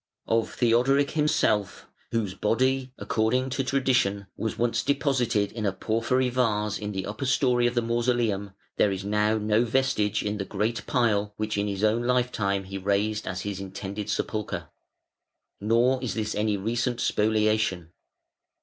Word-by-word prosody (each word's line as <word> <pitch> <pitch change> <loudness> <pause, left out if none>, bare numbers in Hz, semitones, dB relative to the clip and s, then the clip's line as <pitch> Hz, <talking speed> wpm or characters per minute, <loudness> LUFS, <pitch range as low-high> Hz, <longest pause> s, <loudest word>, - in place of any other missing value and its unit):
Of 115 0 0
Theodoric 130 +4 +3
himself, 150 -9 +1 0.2
whose 110 -5 -1
body, 130 +6 0
according 125 +4 0
to 135 - -1
tradition, 130 -7 +1
was 110 - -3
once 120 0 +1
deposited 130 -7 +1
in 110 -1 -5
a 100 - +1
porphyry 115 +6 0
vase 105 -4 0
in 105 0 -4
the 95 -2 -3
upper 105 +6 -4
storey 125 -3 +3
of 120 - -2
the 120 - +2
mausoleum, 115 -4 0 0.2
there 105 - +3
is 95 0 -4
now 105 +1 +2
no 105 +2 +2
vestige 115 -4 +1
in 105 0 -2
the - - -1
great 105 +1 -2
pile 105 -5 +1
which 110 0 -2
in 100 0 0
his 100 0 -3
own 110 +2 +3
life 125 0 +1
time 100 -3 -1
he 95 +1 -6
raised 105 +2 0
as 90 0 -3
his 100 -2 -4
intended 100 +1 -6
sepulchre. 110 -1 -3 0.9
Nor 120 +5 +2
is 125 - -3
this 110 -1 -2
any 105 -1 0
recent 120 +4 -1
spoliation. 110 -6 +1
110 Hz, 160 wpm, -26 LUFS, 105-125 Hz, 0.9 s, Theodoric